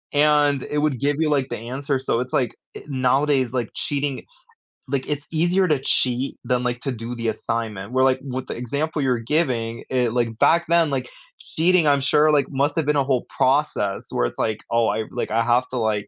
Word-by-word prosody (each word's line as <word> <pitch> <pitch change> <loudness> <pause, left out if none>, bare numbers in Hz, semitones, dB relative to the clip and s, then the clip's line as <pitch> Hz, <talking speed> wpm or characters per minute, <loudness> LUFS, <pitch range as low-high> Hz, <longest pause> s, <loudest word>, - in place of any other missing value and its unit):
and 145 -2 +3
it 150 - -3
would 145 -4 0
give 145 +1 +1
you, 160 -1 +1
like, 140 -3 +1
the - - -4
answer, 135 +5 -3
so, 130 -2 -1
it's 125 +1 -5
like, 125 -5 +1 0.2
eh - - -8
nowadays, 130 -1 +1
like, 120 -3 -1
cheating 140 -2 -2 0.7
like, 135 -2 -1
it's 145 -1 -3
easier 175 +4 +2
to 150 - +2
cheat 130 0 +1
than, 125 0 0
like, 120 0 -1
to 135 - -2
do 115 0 -6
the 115 -1 -3
assignment, 110 -2 -3
where, 130 +1 +2
like, 130 0 +3
with 130 -2 -5
the - - -5
example 145 +5 -2
you're 125 -3 +1
giving, 115 -3 -1
it 125 -3 +1
like, 120 -2 +1
back 170 +1 +4
then, 170 -2 +3
like, 135 -2 -2 0.3
cheating, 175 0 +1
I'm 140 -1 +3
sure, 150 +3 +4
like, 145 -3 +2
must've 145 +2 0
been 150 - +2
a 140 - +3
whole 130 -2 -1
process 130 -8 +1
where - - 0
it's - - -5
like, 110 -1 -1
"Oh, 115 -1 +3
I 110 +1 0
like, - - -3
I 115 +2 +1
have 120 +2 +2
to, 130 - -4
like, 110 -3 -1
130 Hz, 215 wpm, -22 LUFS, 120-145 Hz, 0.7 s, back